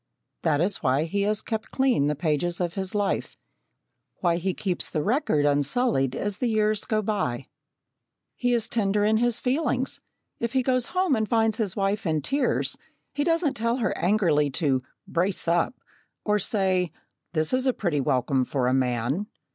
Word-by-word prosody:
That 155 -3 +2
is 195 +4 +2
why 135 +1 +1
he 200 +5 -1
has 215 0 0
kept 220 -1 -4
clean 260 - +2
the 150 - 0
pages 160 +3 -1
of 175 -2 -1
his 190 0 -4
life 205 -1 -1 0.8
why 170 -2 +1
he 190 +2 -1
keeps 185 -4 -2
the 150 - -1
record 210 - +1
unsullied 145 - +2
as 205 -1 -2
the 250 - +1
years 215 -1 +1
go 215 -1 0
by. 140 - -1 0.9
He 245 0 0
is 230 - -1
tender 205 -2 +1
in 215 +1 +3
his 240 0 +1
feelings; 260 -1 0 0.4
if 235 -1 -2
he 260 -1 +2
goes 255 -1 +1
home 365 -7 +3
and 220 -2 -1
finds 225 -1 +2
his 205 -5 0
wife 195 -1 0
in 155 -2 0
tears, 275 -1 0 0.3
he 290 - 0
doesn't 330 -2 +1
tell 230 0 0
her 235 - -1
angrily 170 -7 +2
to 135 -2 0 0.3
"brace 180 +1 0
up," 170 +9 +2 0.5
or 210 0 +2
say, 190 -5 0 0.4
"this 155 +3 0
is 260 +1 +2
a - - +5
pretty 170 -11 -1
welcome 130 -1 +1
for 130 0 -1
a 125 - +2
man!" 130 - 0
200 Hz, 175 wpm, -26 LUFS, 155-230 Hz, 0.9 s, a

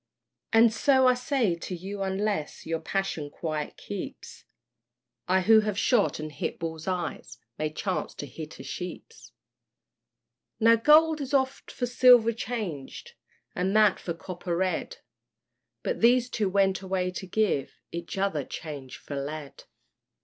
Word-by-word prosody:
And 225 0 +6
so 260 +3 +4
I 255 - +6
say 250 -5 0
to 170 +2 -5
you 195 +3 -6
unless 195 -4 -2
Your 165 0 -2
passion 165 -3 -2
quiet 155 0 -4
keeps, - - -8 0.8
I 185 +1 +3
who 220 +4 +6
have 210 -2 -1
shot 225 -5 +2
and 155 0 -5
hit - - -4
bulls' 160 0 -5
eyes, 175 -11 -3 0.2
May 155 0 0
chance 185 +4 -3
to - - -6
hit 155 +3 -9
a - - -7
sheep's. 180 - -8 1.3
Now 230 0 +6
gold 310 +6 +5
is 280 +1 -1
oft 265 0 0
for 250 - -2
silver 245 -2 +6
changed, 210 - -5 0.4
And 190 +3 -1
that 210 -3 +5
for 170 - -4
copper 175 0 -4
red; 185 -2 -1 0.9
But - - -2
these 245 +1 +4
two 210 -4 0
went 195 0 +2
away 185 -1 -1
to 190 +1 -7
give 190 -8 0 0.2
Each 170 +2 -6
other 190 -7 0
change 140 -3 -7
for 145 - -8
lead. 150 0 -7
190 Hz, 145 wpm, -27 LUFS, 165-230 Hz, 1.3 s, And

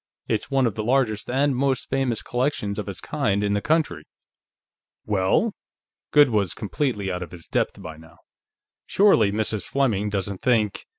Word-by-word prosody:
It's 110 -2 -1
one 135 -2 +2
of 115 - 0
the 110 - -4
largest 120 -3 0
and 135 +2 +1
most 135 0 0
famous 130 -4 -1
collections 125 -5 -1
of - - -4
its - - -5
kind 100 +1 -1
in 100 0 +1
the 100 - 0
country." 150 - 0 1.0
"Well?" 105 - +1 0.6
Goode 145 -3 +5
was 100 -4 0
completely 105 -3 -2
out 90 0 -4
of 90 - -7
his 85 -2 -12
depth - - -1
by 80 -5 -8
now. 80 +1 -17 0.7
"Surely 190 - +4
Mrs. 110 0 -2
Fleming 110 -7 0
doesn't 100 -1 -3
think...?" 110 -5 +1
110 Hz, 165 wpm, -24 LUFS, 100-135 Hz, 1.0 s, Goode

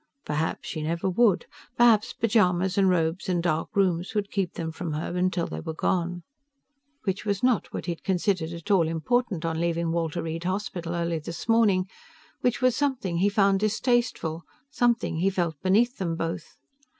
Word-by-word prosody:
Perhaps 155 +2 -2
she 155 - -4
never 165 +4 -1
would. 200 +1 +3 0.3
Perhaps 230 -3 +4
pajamas 190 -5 +2
and 195 -1 +4
robes 170 +1 0
and 175 -2 +1
dark 160 -2 0
rooms 185 0 +1
would 205 -1 -1
keep 195 -4 -1
them 160 -1 -3
from 160 -1 -5
her 160 +3 -3
until 180 -1 +1
they 80 - -5
were 160 - -5
gone. 175 0 -1 0.8
Which 195 -2 -2
was 200 0 -2
not 250 -3 +2
what - - -5
he'd 170 -2 -4
considered 185 -3 0
at 170 +4 -5
all 175 -5 +4
important 175 +3 0
on 165 0 -1
leaving 170 -1 0
Walter 165 0 -1
Reed 165 +1 -4
Hospital 180 -3 -3
early 170 -1 -1
this 165 +5 -7
morning; 210 -5 +3 0.5
which 245 +1 0
was 255 -2 +4
something 255 -12 -1
he 195 +4 +3
found 200 -1 +3
distasteful, 215 -6 0 0.3
something 240 - +1
he 185 +4 +2
felt 170 -6 -2
beneath 225 +7 +3
them 170 -3 -1
both. 165 0 -4
180 Hz, 175 wpm, -26 LUFS, 165-205 Hz, 0.8 s, Perhaps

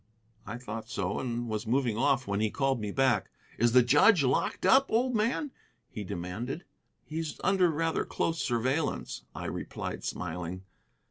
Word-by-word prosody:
I 110 +4 -4
thought 115 -2 -7
so, 100 -2 -2
and 120 -1 -3
was 110 0 -3
moving 120 -2 +1
off 125 +3 +2
when 100 0 -1
he 110 0 +2
called 135 +2 0
me 105 - -3
back. 130 -5 +2 0.3
"Is 120 +1 +3
the 125 -1 +7
judge 145 - +5
locked 130 0 0
up, 270 +1 +5
old 245 +2 +2
man?" 235 +7 0 0.4
he 105 - -5
demanded. 100 - -5 0.4
"He's 160 0 -4
under 185 -1 +4
rather 165 +1 0
close 165 -2 -1
surveillance," 130 +5 -1
I - - -5
replied, - - -5
smiling. 90 +1 -4
125 Hz, 155 wpm, -30 LUFS, 110-160 Hz, 0.4 s, the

